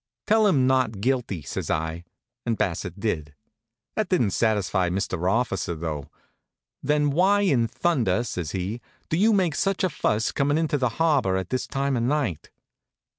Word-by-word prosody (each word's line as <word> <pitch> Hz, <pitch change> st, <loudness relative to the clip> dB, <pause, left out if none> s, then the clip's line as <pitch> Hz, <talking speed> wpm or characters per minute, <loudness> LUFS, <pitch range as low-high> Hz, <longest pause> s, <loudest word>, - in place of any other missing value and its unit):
"Tell 220 Hz, 0 st, +4 dB
him 140 Hz, -10 st, +3 dB
not 130 Hz, -5 st, +1 dB
guilty," 115 Hz, -, -1 dB
says -, -, -5 dB
I, 80 Hz, +2 st, -2 dB, 0.4 s
and 115 Hz, -2 st, -1 dB
Bassett 90 Hz, +1 st, -2 dB
did. 80 Hz, -9 st, -2 dB, 0.6 s
That 215 Hz, -, -1 dB
didn't 125 Hz, -, +2 dB
satisfy 100 Hz, -4 st, +1 dB
Mr. 90 Hz, -1 st, -1 dB
Officer 100 Hz, -7 st, 0 dB
though. 75 Hz, -3 st, -5 dB, 0.7 s
"Then 150 Hz, 0 st, +2 dB
why 190 Hz, +7 st, +3 dB
in 135 Hz, -, +2 dB
thunder," 120 Hz, -, +1 dB
says 90 Hz, -9 st, -4 dB
he, 95 Hz, +6 st, -3 dB, 0.3 s
"do -, -, +1 dB
you 215 Hz, +5 st, +4 dB
make 185 Hz, -6 st, +2 dB
such 195 Hz, +5 st, 0 dB
a 185 Hz, -, +3 dB
fuss 110 Hz, -7 st, 0 dB
coming 145 Hz, +2 st, +1 dB
into 155 Hz, -3 st, 0 dB
the 125 Hz, -2 st, +2 dB
harbor 145 Hz, -13 st, +2 dB
at 95 Hz, -1 st, -4 dB
this 130 Hz, -1 st, -1 dB
time 140 Hz, 0 st, -1 dB
of 120 Hz, -, 0 dB
night?" 125 Hz, -, -1 dB
120 Hz, 165 wpm, -25 LUFS, 95-150 Hz, 0.7 s, Tell